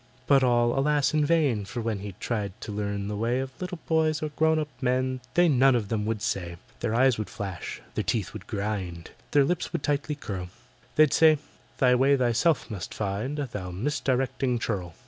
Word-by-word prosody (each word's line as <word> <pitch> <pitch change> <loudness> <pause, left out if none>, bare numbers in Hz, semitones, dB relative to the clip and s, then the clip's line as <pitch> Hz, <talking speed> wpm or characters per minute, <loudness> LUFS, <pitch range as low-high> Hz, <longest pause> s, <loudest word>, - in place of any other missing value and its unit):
But 135 -1 +5
all, 120 0 +3
alas! 145 0 +2
in 155 -1 +3
vain, 145 -9 +2
for 100 +5 -6
when 110 -3 -2
He 100 -1 -7
tried 105 -5 -3
to - - -6
learn 100 -1 -3
the 105 - -3
way 115 +4 0
Of 130 0 -4
little 180 -1 -4
boys 155 -1 +1
or 155 - -1
grown 160 +2 +2
up 155 -1 -1
men, 130 0 0 0.2
They 175 0 +5
none 135 -3 +5
of 110 -4 -1
them 105 -1 -1
would 110 -1 -2
say. 90 -6 -2 0.2
Their 110 - -1
eyes 130 -2 +4
would 110 - -3
flash—their 95 -3 -5
teeth 110 -6 -1
would 110 -4 -9
grind— 100 -6 -4 0.2
Their 145 - +4
lips 175 +4 -1
would 170 -5 -3
tightly 145 +1 0
curl— 95 -10 -5 0.5
They'd 155 -2 +5
say, 155 -1 +6 0.4
"Thy 125 -2 +4
way 135 +3 +4
thyself 125 +4 +1
must 95 -5 -6
find, 105 +8 -2
Thou 110 -10 -4
misdirecting 130 +3 0
churl!" 95 -8 -3
125 Hz, 190 wpm, -27 LUFS, 105-145 Hz, 0.5 s, say